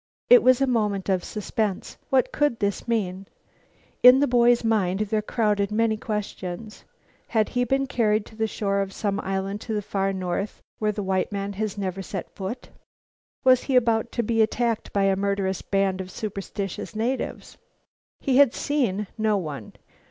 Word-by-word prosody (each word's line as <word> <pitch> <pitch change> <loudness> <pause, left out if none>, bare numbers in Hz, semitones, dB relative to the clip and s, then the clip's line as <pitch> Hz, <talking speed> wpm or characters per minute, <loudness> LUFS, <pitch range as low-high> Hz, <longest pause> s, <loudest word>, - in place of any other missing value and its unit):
It - - +10
was 255 0 +4
a - - +5
moment 210 -6 0
of 185 -2 +1
suspense. 210 -2 -3
What 260 -2 +2
could 290 -5 +1
this 200 +1 -2
mean? 195 -4 -1 0.7
Into 250 +2 +8
the 285 - +3
boy's 240 -1 +4
mind 205 -4 +1
there 215 0 0
crowded 210 -2 0
many 220 +1 +2
questions. 210 -1 -5 0.4
Had 220 -2 +1
he 245 0 0
been 270 +3 +1
carried 220 -5 +1
to 220 - -15
the 220 0 0
shore 200 -2 -1
of 195 0 -4
some 200 -1 -2
island 195 +2 -3
of 220 - 0
the 210 - 0
far 195 0 -1
north 190 +1 -3 0.2
where 215 -1 +1
the 205 -1 -4
white 190 +1 0
man 200 0 -3
had 210 0 -3
never 195 -1 -3
set 190 0 -6
foot? 200 +6 -6 0.7
Was 255 -1 +5
he 270 - 0
about 230 -2 +2
to 235 - 0
be 225 +1 +1
attacked 230 +1 0
by 200 - +1
a 195 -1 +3
murderous 195 -1 -1
band 195 -1 0
of 185 - -8
superstitious 200 0 -5
natives? 240 +5 -3 0.6
He 265 -3 +1
had 280 -4 +6
seen 235 -9 0
no 215 -1 +2
one. 145 - -6
210 Hz, 175 wpm, -25 LUFS, 195-230 Hz, 0.7 s, It